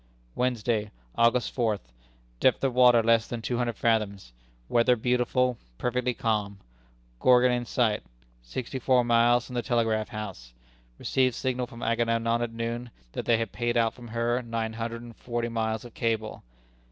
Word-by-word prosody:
"Wednesday, 115 -4 0 0.3
August 115 +1 +3
fourth. 110 - -1 0.5
Depth 130 - +3
of 135 -2 +1
water 125 -2 +6
less 115 -1 +3
than 120 - -4
two 120 +2 -2
hundred 120 -2 -1
fathoms. 100 - 0 0.3
Weather 120 - +4
beautiful, 125 +1 +1 0.2
perfectly 125 0 -1
calm. 105 -4 -1 0.6
Gorgon 125 0 +5
in 120 0 -1
sight. 115 -3 +1 0.4
Sixty 125 - -5
four 125 0 +3
miles 120 +1 +4
from - - -10
the 120 - 0
telegraph 115 -3 0
house. - - -7 0.4
Received 130 -2 +1
signal 125 -1 -2
from 115 0 -10
Agamemnon 115 0 +1
at 120 -1 -2
noon 115 +1 -4 0.2
that - - -5
they 115 - +4
had 115 0 -3
paid 120 0 -1
out 115 -1 +2
from 120 -2 -12
her 115 +2 0
nine 115 -2 -3
hundred 115 +1 -5
and 120 -1 -11
forty 120 -1 -3
miles 110 0 -2
of 120 - -11
cable. 110 -2 -2
115 Hz, 160 wpm, -27 LUFS, 115-125 Hz, 0.6 s, water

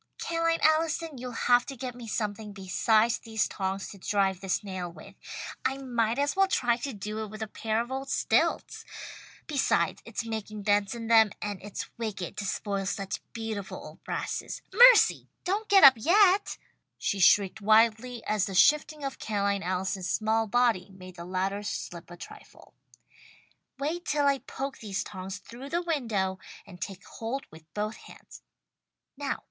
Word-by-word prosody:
"Ca'line 330 0 0
Allison, 315 -2 +2
you'll 250 0 -5
have 245 +1 +3
to 275 - -7
get 250 0 -5
me 240 -1 -10
something 210 -1 -3
besides 215 +4 +2
these 220 -2 -1
tongs 190 0 -3
to 200 - -11
drive 195 -1 0
this 195 +2 -1
nail 185 -3 -5
with. 170 +4 -13 0.5
I 270 - 0
might 240 -3 0
as 285 +1 +1
well 390 0 +4
try 240 -10 +1
to 275 +3 -4
do 210 0 -5
it - - -6
with 215 +1 -6
a - - -4
pair 220 +1 -2
of 265 +3 -4
stilts. - - +1 0.6
Besides 290 -4 +1
it's - - -5
making 215 -2 -5
dents 205 +2 +2
in 230 -1 -6
them, 220 -2 +5
and 205 -2 -4
it's 205 +1 -6
wicked 205 -6 -4
to 205 - -3
spoil 195 0 -2
such 195 -2 -3
beautiful 220 -4 -5
old - - -12
brasses. - - -4
Mercy! - - +7 0.2
Don't 410 +4 -1
get 395 -1 +7
up 275 -2 +12
yet!" 385 - +4 0.4
she 200 - -1
shrieked 200 +3 +4
wildly, 225 +3 +3
as 210 -2 +1
the 195 - -5
shifting 300 +6 +4
of 275 -1 -4
Ca'line 200 -2 0
Allison's 185 +1 -2
small 220 +1 +1
body 230 -5 +2
made 185 -1 -12
the 170 -1 -8
ladder 190 +2 -2
slip 175 -4 -6
a 175 - -10
trifle. - - -13 1.0
"Wait 320 +5 -2
till 295 -1 +1
I 280 -1 +3
poke 270 +1 -6
these 205 -3 -3
tongs 190 0 -7
through 235 +7 -10
the 345 +3 -1
window 220 - -1 0.3
and 180 -2 -13
take 195 -2 -6
hold 245 +5 -5
with 160 0 -16
both 210 +1 -2
hands. - - -14 0.7
Now! 280 0 -3
220 Hz, 165 wpm, -28 LUFS, 195-270 Hz, 1.0 s, up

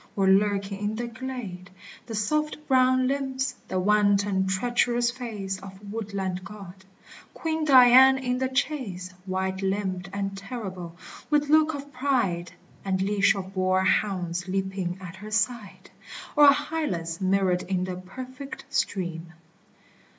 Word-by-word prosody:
or 195 -1 +2
lurking 200 0 +2
in 210 +1 -2
the 240 +2 -3
glade, 235 -7 -7 0.4
The 225 - -5
soft 300 +9 0
brown 255 -1 +4
limbs, 265 -1 -1
the 185 - -1
wanton 200 -1 +2
treacherous 240 +4 +1
face 210 -6 -5
Of 195 +2 -10
woodland 195 -4 -3
god! 190 -2 -11 0.5
Queen 320 -1 -2
Dian 260 -1 +8
in 250 -1 -1
the 260 - +1
chase, 260 - -2 0.2
White 190 0 -2
limbed 195 -1 -2
and 195 0 -3
terrible, 195 -5 -7 0.3
with 295 -1 +2
look 310 0 +4
of 285 0 -9
pride, 235 -11 0 0.3
And 190 -1 -1
leash 200 +1 +3
of 190 -1 -6
boar 185 0 +2
hounds 180 -3 0
leaping 190 -1 -2
at 185 0 -9
her 210 +2 -9
side! 215 -1 -2 0.4
Or 295 -1 +8
Hylas 280 - -1
mirrored 185 -1 +2
in 185 0 -1
the 185 -1 -4
perfect 255 +9 -9
stream. 175 -3 -2
200 Hz, 135 wpm, -26 LUFS, 190-255 Hz, 0.5 s, Dian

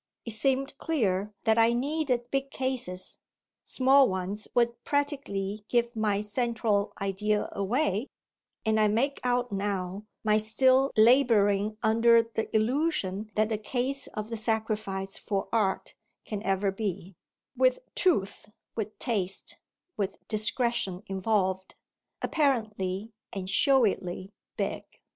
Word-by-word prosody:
It 230 - 0
seemed 270 +5 0
clear 210 - 0
that 225 -1 +3
I 230 +1 +5
needed 255 -2 -1
big 275 0 -1
cases 255 -10 -3 0.4
small 270 +1 +4
ones 190 +3 -3
would 235 0 +1
practically 220 -9 -2
give 235 0 +1
my 210 -2 +1
central 220 -2 0
idea 205 +2 0
away; 210 +3 0 0.6
and 220 0 +2
I 215 - +5
make 250 +7 +1
out 245 0 +1
now 195 0 -3 0.2
my 215 -1 +3
still 260 +5 +3
labouring 215 -4 +4
under 230 +1 +5
the 225 -1 -4
illusion 220 - 0
that 215 0 +2
the 215 -2 -1
case 260 +5 -2
of 215 +1 -4
the 230 - -2
sacrifice 215 -3 -2
for 195 -2 -2
art 205 -4 0 0.3
can 210 -2 -4
ever 195 -1 +1
be, 195 -2 -4 0.4
with - - +3 0.2
truth, 205 - +1 0.3
with 215 -1 -4
taste, 195 -6 -2 0.4
with 200 -1 -2
discretion 215 -3 0
involved, 190 -1 -1 0.5
apparently 220 - 0 0.2
and 190 -2 -4
showily 195 -5 +2 0.3
"big." - - -2
220 Hz, 120 wpm, -28 LUFS, 200-245 Hz, 0.6 s, I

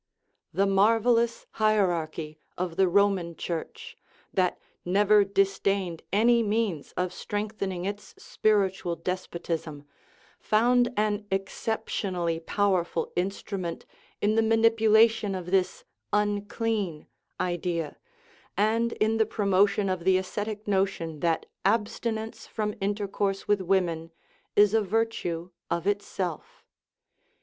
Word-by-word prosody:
The 195 +4 +2
marvellous 230 +4 +3
hierarchy 170 -8 0 0.2
of 175 -2 -3
the 190 +1 +4
Roman 190 -3 +2
Church, 450 - -5 0.4
that 185 -2 +1 0.2
never 205 +3 +4
disdained 195 -3 0
any 235 +4 +4
means 210 -7 -1
of 180 0 -2
strengthening 205 -4 -3
its 205 0 -6
spirit 205 -3 +1
ual 170 -5 -5
despotism, 170 -4 -4 0.6
found 240 +3 +3
an 210 0 0
exceptionally 190 -3 -2
powerful 175 -2 0
instru 195 +2 -2
ment 170 -2 -5 0.4
in 210 +1 +3
the 225 - +3
manipulation 225 -2 +4
of 180 -1 -6
this 190 -1 +1 0.2
" - - -54 0.2
unclean 205 -4 -2 0.2
" - - -49
idea, 175 -3 -2 0.6
and 225 +3 +2
in 220 +1 +1
the 220 -1 +2
promotion 200 -1 +2
of 185 -2 -2
the 190 +1 +4
ascetic 205 +3 -4
notion 190 -6 0
that 165 0 0 0.2
abstinence 220 +1 -1
from 210 -1 -2
intercourse 200 -1 -1
with 205 -2 +2
women 170 -3 0 0.4
is 205 0 +5
a 225 - +4
virtue 190 -5 -1 0.2
of 170 0 -1
itself. 195 -4 -3
195 Hz, 115 wpm, -27 LUFS, 180-215 Hz, 0.6 s, is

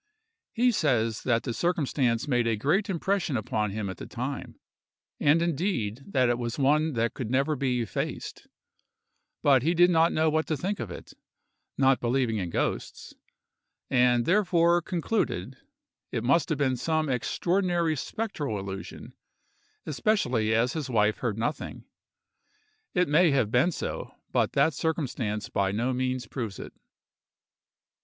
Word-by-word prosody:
He 245 +1 +3
says 120 - +1
that 115 -2 +2
the 120 - -3
circumstance 140 -7 0
made 120 -4 +1
a 115 - +2
great 155 - +1
impression 190 -5 0
upon 105 -1 -1
him 105 0 -3
at 95 - -6
the - - -8
time; - - -5 0.6
and, 155 +3 +4
indeed, 150 - -1
that 130 -10 +2
it 120 0 +1
was 120 -1 -3
one 150 +3 +2
that 115 -1 0
could 120 -4 -5
never 135 +4 +1
be 130 -2 0
effaced; 115 - -5 1.0
but 135 -3 +5
he 165 +7 +1
did 175 +1 +5
not 165 0 +4
know 160 +1 +2
what 155 0 +1
to 155 - -1
think 195 +8 -3
of - - -4
it, - - -10 0.6
not 135 -1 +4
believing 120 -2 0
in 90 -3 -3
ghosts, - - -3 0.8
and 125 -1 +3
therefore 175 -3 +3
concluded 165 - -2 0.6
it 115 - -2
must 140 +5 +2
have 155 - 0
been 130 -3 +1
some 155 +2 0
extraordinary 170 - 0
spectral 150 - -3
illusion, 95 0 -7 0.7
especially 130 - +1
as 115 +3 +2
his 155 -4 -4
wife 110 -3 +2
heard 115 -4 -2
nothing. 130 +7 -4 1.1
It 180 -1 +3
may 160 +4 +4
have 130 -7 +1
been 130 +9 +3
so; - - -5 0.2
but - - +1
that 160 - +3
circumstance 130 -10 -2
by 95 -1 0
no 120 +6 0
means 130 -1 -1
proves 110 -4 -5
it. - - -9
135 Hz, 150 wpm, -27 LUFS, 115-165 Hz, 1.1 s, but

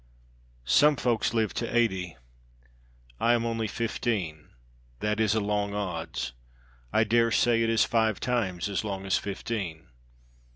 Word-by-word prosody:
"Some 150 - +5
folk 120 -3 0
live 110 -2 0
to 120 0 -2
eighty; 95 - 0 1.0
I 120 - +4
am 115 -1 +1
only 115 -1 -1
fifteen; 100 -9 -2 0.5
that 105 +1 -1
is 110 -1 +2
a - - +3
long 100 -1 -1
odds, 85 -10 -3 0.6
I 110 - +4
dare 115 +2 +3
say 115 0 +3
it 115 - +2
is 115 -1 +3
five 110 -2 +1
times 105 -8 -1
as 100 +1 -2
long 95 -2 -4
as 95 - +2
fifteen. 95 -5 -5
110 Hz, 140 wpm, -28 LUFS, 95-115 Hz, 1.0 s, Some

